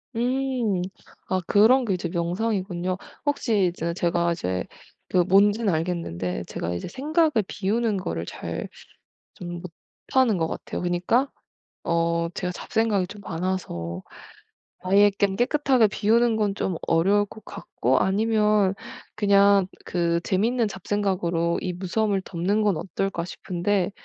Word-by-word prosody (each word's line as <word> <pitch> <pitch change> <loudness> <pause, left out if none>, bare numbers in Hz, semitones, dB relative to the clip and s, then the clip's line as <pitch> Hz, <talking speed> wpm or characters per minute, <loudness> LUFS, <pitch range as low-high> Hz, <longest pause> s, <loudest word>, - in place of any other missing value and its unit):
음. 245 -5 0 0.5
아 185 - 0
그런 240 +8 +5
게 205 - 0
이제 180 -1 -3
명상이군요. 185 0 -1 0.3
혹시 230 -8 +2
이제 170 -1 -3
제가 170 -1 +1
이제 95 - -2 0.4
그 - - 0
뭔지는 200 +4 +4
알겠는데 155 - -2
제가 85 +1 -4
이제 85 - -4
생각을 310 - +1 0.2
비우는 210 +1 0
거를 170 - -3
잘 - - -5 0.7
좀 175 -1 -7 0.5
못하는 255 -7 +3
것 160 -1 0
같아요. - - -5
그니까 180 +10 +1 0.5
어 170 0 +1
제가 180 0 -3
잡생각이 210 0 0
좀 205 +3 -11
많아서 165 - -3 0.9
아예 205 +1 +6
그냥 200 -1 +2
깨끗하게 260 0 +3
비우는 225 +3 +2
건 210 -2 0
좀 185 -4 -2
어려울 195 +5 +3
것 220 - -14
같고 130 +2 -1
아니면 210 0 +2 0.4
그냥 200 -2 +4 0.2
그 170 -1 0
‘재밌는 225 +5 +1
잡생각으로 185 -4 -1
이 180 - -2
무서움을 195 +2 0
덮는 195 +5 0
건 205 -5 +2
어떨까.‘ 195 0 -3
싶은데 180 +2 -1
195 Hz, 275 characters per minute, -25 LUFS, 175-215 Hz, 0.9 s, 아예